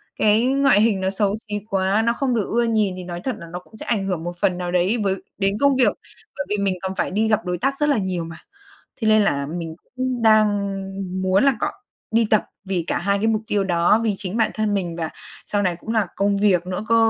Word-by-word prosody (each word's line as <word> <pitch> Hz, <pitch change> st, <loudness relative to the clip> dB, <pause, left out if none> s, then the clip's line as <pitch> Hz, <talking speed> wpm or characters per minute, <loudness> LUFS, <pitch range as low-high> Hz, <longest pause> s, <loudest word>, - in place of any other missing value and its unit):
cái 215 Hz, +2 st, +3 dB
ngoại 270 Hz, -5 st, +4 dB
hình 215 Hz, -4 st, +2 dB
nó 190 Hz, -, +1 dB
xấu 200 Hz, +1 st, 0 dB
xí 210 Hz, -2 st, -5 dB
quá, 195 Hz, +2 st, +2 dB
nó 235 Hz, -, +3 dB
không 255 Hz, 0 st, 0 dB
được 215 Hz, -4 st, 0 dB
ưa 235 Hz, +1 st, +2 dB
nhìn 215 Hz, -4 st, +1 dB
thì 185 Hz, -, -6 dB
nói 175 Hz, -1 st, -6 dB
thật 260 Hz, -, -2 dB
là 170 Hz, -, -9 dB
nó 175 Hz, -, -4 dB
cũng 220 Hz, +4 st, -17 dB
sẽ -, -, -8 dB
ảnh 205 Hz, -4 st, 0 dB
hưởng 180 Hz, -4 st, -2 dB
một 175 Hz, -, -3 dB
phần 180 Hz, -2 st, +2 dB
nào 180 Hz, -1 st, -3 dB
đấy 180 Hz, +6 st, +2 dB
với 195 Hz, -1 st, +1 dB, 0.2 s
đến 195 Hz, 0 st, +1 dB
công 280 Hz, -1 st, +4 dB
việc, 255 Hz, -1 st, +3 dB, 0.4 s
bởi 285 Hz, -, -2 dB
vì 210 Hz, -, 0 dB
mình 200 Hz, -2 st, 0 dB
còn 190 Hz, 0 st, -3 dB
phải -, -, -1 dB
đi 215 Hz, +3 st, +1 dB
gặp 215 Hz, -2 st, +1 dB
đối 180 Hz, 0 st, -1 dB
tác 275 Hz, +9 st, -1 dB
rất 295 Hz, +1 st, +1 dB
là 285 Hz, -, +3 dB
nhiều 185 Hz, -4 st, -2 dB
mà. 165 Hz, 0 st, -8 dB, 0.6 s
Thế 220 Hz, -, -2 dB
nên 215 Hz, 0 st, +5 dB
là 140 Hz, -8 st, 0 dB
mình 165 Hz, -2 st, -5 dB
cũng 255 Hz, -1 st, -3 dB
đang 215 Hz, -1 st, +6 dB, 0.7 s
muốn 190 Hz, +4 st, +3 dB
là 275 Hz, -2 st, +4 dB
cọ -, -, +1 dB, 0.4 s
đi 225 Hz, 0 st, +3 dB
tập 215 Hz, -, +3 dB, 0.2 s
vì 190 Hz, -3 st, -1 dB
cả -, -, 0 dB
2 200 Hz, +3 st, +1 dB
cái 220 Hz, -, +1 dB
mục 220 Hz, -1 st, +1 dB
tiêu 205 Hz, -1 st, +1 dB
đó, 175 Hz, +3 st, +3 dB
vì 220 Hz, -2 st, +1 dB
chính 195 Hz, +3 st, -4 dB
bản 220 Hz, -1 st, +2 dB
thân 215 Hz, -1 st, 0 dB
mình 175 Hz, -4 st, -2 dB
và 165 Hz, -2 st, -3 dB, 0.4 s
sau 205 Hz, -, 0 dB
này 180 Hz, -3 st, +1 dB
cũng 220 Hz, -, -11 dB
là 215 Hz, -4 st, +2 dB
công 200 Hz, 0 st, +1 dB
việc 190 Hz, -4 st, +3 dB
nữa 185 Hz, +3 st, -3 dB
cơ. 230 Hz, -, +5 dB
205 Hz, 260 wpm, -22 LUFS, 185-225 Hz, 0.7 s, đang